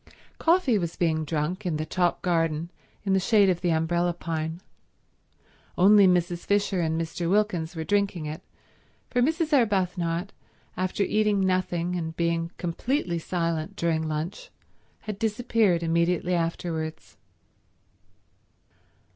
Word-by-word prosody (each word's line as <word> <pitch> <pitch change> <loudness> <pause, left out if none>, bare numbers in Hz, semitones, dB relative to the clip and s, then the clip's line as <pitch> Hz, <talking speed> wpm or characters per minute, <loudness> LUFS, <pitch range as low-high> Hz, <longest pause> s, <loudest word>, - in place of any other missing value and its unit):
Coffee 325 - +3
was 170 -2 -3
being 160 -2 0
drunk 160 +6 -2
in 170 -5 -1
the 155 - -3
top 175 +2 0
garden 165 -1 0 0.3
in 195 -2 +1
the 190 - +4
shade 200 0 +4
of 175 - -3
the 180 - +1
umbrella 170 +2 +1
pine. 160 -1 -4 1.2
Only 200 +2 +7
Mrs. 175 -1 +1
Fisher 200 -2 +1
and 160 0 0
Mr. 165 +1 -3
Wilkins 180 -5 0
were 160 - -3
drinking 200 -3 0
it, 150 +1 -5 0.7
for 245 - +2
Mrs. 320 +3 +1
Arbuthnot, 185 -7 +1 0.5
after 185 +2 -1
eating 210 0 +2
nothing 180 -2 0
and 160 -2 -4
being 170 0 0
completely 175 - -1
silent 165 -2 -2
during 165 -2 0
lunch, 155 +4 -4 0.5
had 210 -2 -6
disappeared 220 -5 +1
immediately 170 +2 +1
afterwards. 165 -2 -3
175 Hz, 125 wpm, -26 LUFS, 165-195 Hz, 1.2 s, Only